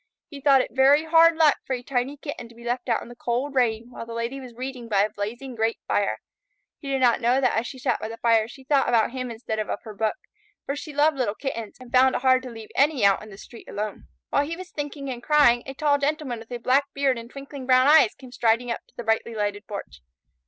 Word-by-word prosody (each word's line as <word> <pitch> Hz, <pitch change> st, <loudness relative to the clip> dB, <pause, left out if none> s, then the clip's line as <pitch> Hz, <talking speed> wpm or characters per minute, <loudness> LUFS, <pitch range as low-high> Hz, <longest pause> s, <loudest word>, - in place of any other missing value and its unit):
He 285 Hz, -3 st, -10 dB
thought 275 Hz, -2 st, +5 dB
it -, -, -5 dB
very 275 Hz, +4 st, +5 dB
hard 330 Hz, +1 st, +5 dB
luck 315 Hz, -2 st, +4 dB
for 265 Hz, -, -3 dB
a 245 Hz, -, -8 dB
tiny 265 Hz, +2 st, -2 dB
Kitten 280 Hz, -5 st, -7 dB
to 235 Hz, -, -17 dB
be 235 Hz, -, -14 dB
left 245 Hz, +1 st, -3 dB
out 230 Hz, -, +1 dB
in -, -, -12 dB
the 240 Hz, -, -11 dB
cold 245 Hz, +4 st, -2 dB
rain 235 Hz, -2 st, 0 dB
while -, -, -7 dB
the 230 Hz, 0 st, -8 dB
Lady 235 Hz, +4 st, -3 dB
was 250 Hz, -3 st, -11 dB
reading 250 Hz, -1 st, -6 dB
by 200 Hz, -2 st, +3 dB
a 210 Hz, -, -1 dB
blazing 230 Hz, +6 st, -5 dB
grate 225 Hz, 0 st, 0 dB
fire. -, -, 0 dB, 0.6 s
He 280 Hz, -, -7 dB
did 270 Hz, -1 st, 0 dB
not 245 Hz, -1 st, +4 dB
know 245 Hz, +3 st, +3 dB
that 255 Hz, -3 st, +2 dB
as 230 Hz, +2 st, 0 dB
she 265 Hz, -, -8 dB
sat 255 Hz, -, 0 dB
by -, -, -4 dB
the 225 Hz, +1 st, -8 dB
fire 225 Hz, -2 st, +3 dB
she 265 Hz, +3 st, -13 dB
thought 275 Hz, -1 st, +2 dB
about 230 Hz, -1 st, +3 dB
him 255 Hz, -1 st, -4 dB
instead 220 Hz, -1 st, -4 dB
of 215 Hz, -, -2 dB, 0.2 s
her 215 Hz, -, -9 dB
book, 215 Hz, +1 st, -1 dB, 0.5 s
for 280 Hz, -, -2 dB
she 305 Hz, +1 st, -7 dB
loved 295 Hz, +1 st, +2 dB
little 215 Hz, -5 st, 0 dB
Kittens, 230 Hz, -6 st, -5 dB
and 250 Hz, -2 st, -13 dB
found 260 Hz, +1 st, +5 dB
it -, -, -2 dB
hard 260 Hz, -1 st, +5 dB
to 255 Hz, -, -8 dB
leave 225 Hz, -2 st, -10 dB
any 280 Hz, -5 st, +3 dB
out 200 Hz, -1 st, +4 dB
in 215 Hz, -, -11 dB
the 195 Hz, -, -12 dB
street 230 Hz, +3 st, -13 dB
alone. 210 Hz, 0 st, -5 dB, 0.2 s
While 285 Hz, 0 st, +2 dB
he 330 Hz, +1 st, -4 dB
was 370 Hz, 0 st, -9 dB
thinking 290 Hz, -1 st, -5 dB
and 240 Hz, -1 st, -6 dB
crying, 285 Hz, -4 st, +4 dB
a 270 Hz, -, -6 dB
tall 285 Hz, 0 st, +2 dB
Gentleman 285 Hz, -4 st, -2 dB
with 225 Hz, +2 st, -14 dB
a 245 Hz, -, -3 dB
black 260 Hz, +4 st, +2 dB
beard 275 Hz, -3 st, +1 dB
and 230 Hz, 0 st, -10 dB
twinkling 275 Hz, 0 st, -9 dB
brown 255 Hz, 0 st, +5 dB
eyes 295 Hz, -6 st, +6 dB
came 255 Hz, -2 st, -13 dB
striding 235 Hz, 0 st, +1 dB
up -, -, -3 dB
to -, -, -30 dB
the 240 Hz, -, -5 dB
brightly 225 Hz, +1 st, 0 dB
lighted 205 Hz, -1 st, -3 dB
porch. 200 Hz, -, -8 dB
250 Hz, 260 wpm, -25 LUFS, 230-275 Hz, 0.6 s, eyes